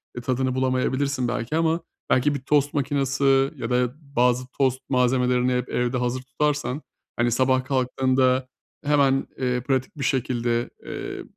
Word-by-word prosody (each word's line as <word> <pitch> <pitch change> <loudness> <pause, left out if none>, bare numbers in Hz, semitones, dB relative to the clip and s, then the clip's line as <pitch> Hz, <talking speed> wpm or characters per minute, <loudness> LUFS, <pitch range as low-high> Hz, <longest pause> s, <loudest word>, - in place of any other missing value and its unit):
ııı, 120 - -6
tadını 130 0 0
bulamayabilirsin 130 0 0
belki 120 +4 -2
ama 165 +1 +2 0.3
belki 145 +3 +3
bir - - -3
tost 145 +2 +1
makinesi 135 -1 +2
ya 115 -4 -5
da 125 0 +1
bazı 125 -3 +1
tost 130 -1 +2
malzemelerini 125 -1 +2
hep 125 +1 -4
evde 125 +1 0
hazır 125 +1 -1
tutarsan, 145 +2 -1 0.3
hani, 120 0 +1
sabah 130 +2 +2
kalktığında 130 0 +1 0.4
hemen, 140 -2 +3
eee, 125 -1 0
pratik 130 +3 -1
bir 140 - -3
şekilde, 120 -2 0 0.2
eee, - - -6
130 Hz, 145 wpm, -24 LUFS, 125-135 Hz, 0.4 s, belki